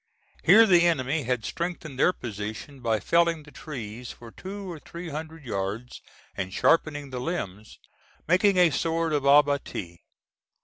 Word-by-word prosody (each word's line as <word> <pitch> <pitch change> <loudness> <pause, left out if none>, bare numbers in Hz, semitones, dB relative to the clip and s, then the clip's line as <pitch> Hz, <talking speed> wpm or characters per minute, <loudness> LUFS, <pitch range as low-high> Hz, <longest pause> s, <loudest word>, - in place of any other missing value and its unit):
Here 225 +1 +8
the 175 -4 +5
enemy 145 -2 0
had 125 -2 -1
strengthened 170 -6 -4
their 180 - +5
position 110 - -7
by 115 -3 0
felling 170 +1 +2
the 145 - -15
trees 120 -6 -7
for 115 -1 -12
two 195 - -8
or 165 - -8
three 170 +3 -8
hundred 160 0 -7
yards 105 +3 -4 0.3
and 95 -1 -4
sharpening 145 - +1
the 125 -1 -4
limbs, 110 - -5 0.5
making 185 +3 +4
a 175 -2 +5
sort 165 +1 0
of 145 -2 0
abattis. 140 -11 +2
145 Hz, 145 wpm, -26 LUFS, 120-170 Hz, 0.5 s, Here